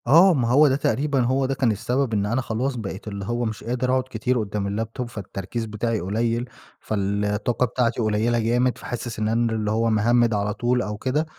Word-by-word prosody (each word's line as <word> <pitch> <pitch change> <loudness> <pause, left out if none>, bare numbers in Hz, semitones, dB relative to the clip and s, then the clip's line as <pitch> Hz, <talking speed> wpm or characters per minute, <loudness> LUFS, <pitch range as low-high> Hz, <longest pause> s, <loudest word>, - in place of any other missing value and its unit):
آه، 170 +8 +7
ما 125 -6 +1
هو 145 +5 +6
ده 135 - +2
تقريبًا 140 0 0
هو 130 +2 +2
ده 135 - 0
كان 130 -3 +2
السبب 125 +4 -1
إن 100 -1 +1
أنا 120 +5 0
خلاص 125 +3 -2
بقيت 105 -2 -6
اللي 100 -2 -5
هو 120 +2 -1
مش 110 -2 -4
قادر 125 +2 -1
أقعد 130 0 +2
كتير 130 -1 0
قدّام 105 -2 -2
اللاب 110 +3 -3
توب 125 -2 -4
فالتركيز 105 +1 -5
بتاعي 110 +1 -2
قليل، 115 +6 -1 0.3
فالطاقة 105 +3 0
بتاعتي 120 -1 0
قليلة 110 +2 +1
جامد، 120 +3 +1
فحاسس 120 -2 -5
إن 105 - 0
أنا 115 +1 +1
اللي 105 -1 -1
هو 115 +1 +1
مهمِّد 115 +2 +3
على 105 0 0
طول 125 +2 +1
أو 105 -3 -4
كده. 135 +7 0
115 Hz, 205 wpm, -23 LUFS, 105-125 Hz, 0.3 s, آه